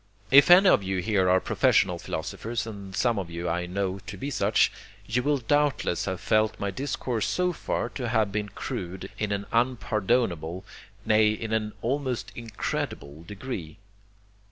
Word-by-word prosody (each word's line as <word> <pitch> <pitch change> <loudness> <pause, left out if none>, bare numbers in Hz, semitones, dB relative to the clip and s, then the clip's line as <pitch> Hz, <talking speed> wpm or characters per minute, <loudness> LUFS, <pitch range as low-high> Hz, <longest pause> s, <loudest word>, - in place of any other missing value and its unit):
If 140 +4 +8
any 185 +3 +8
of - - +5
you 95 0 -2
here 95 -1 +1
are 95 +1 +5
professional - - +2
philosophers, 115 0 -4
and 100 -4 -8
some 115 0 +1
of 90 -3 -5
you 85 +1 -4
I 90 +1 -1
know 95 +1 -2
to - - -6
be 140 +2 -4
such, - - +3 0.3
you 120 +4 0
will 145 +2 +1
doubtless 140 - +1
have 95 -2 -3
felt 110 +2 +1
my 100 -1 -2
discourse 125 -1 -2
so 180 0 0
far 120 - -2
to 125 -2 -4
have 110 -3 +1
been 105 0 -2
crude 95 -1 -6
in 105 -1 -1
an 100 0 -2
unpardonable, 110 -7 0 0.4
nay, 110 0 +4
in 110 +1 -3
an 110 -1 -1
almost 130 0 -2
incredible 105 -9 -4
degree. 95 -3 -7
110 Hz, 160 wpm, -27 LUFS, 95-125 Hz, 0.4 s, If